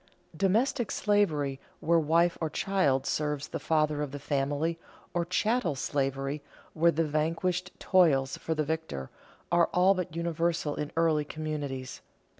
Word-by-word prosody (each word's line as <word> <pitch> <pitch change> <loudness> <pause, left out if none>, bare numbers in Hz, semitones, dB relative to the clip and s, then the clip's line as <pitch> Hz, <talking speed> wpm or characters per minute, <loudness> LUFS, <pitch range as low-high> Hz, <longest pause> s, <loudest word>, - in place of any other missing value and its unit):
Domestic 220 - +1
slavery, 155 -10 +1 0.2
where 165 +1 +3
wife 165 +3 +3
or 160 - 0
child 150 -7 +1
serves 150 -1 -1
the - - -4
father 155 -2 +1
of 150 - -2
the 145 - -6
family, 145 +4 -1 0.3
or 175 -1 0
chattel 215 - +1
slavery, 135 +1 -2 0.3
where 170 +1 +4
the 165 0 +1
vanquished 165 +4 -1
toils 145 -8 +3
for 160 - -3
the 155 - +1
victor, 160 - -4 0.4
are 170 0 +4
all 185 +2 +5
but 180 -3 -4
universal 170 -2 0
in 150 0 -4
early 160 -2 +3
communities. 145 -4 -5
160 Hz, 140 wpm, -29 LUFS, 145-175 Hz, 0.4 s, all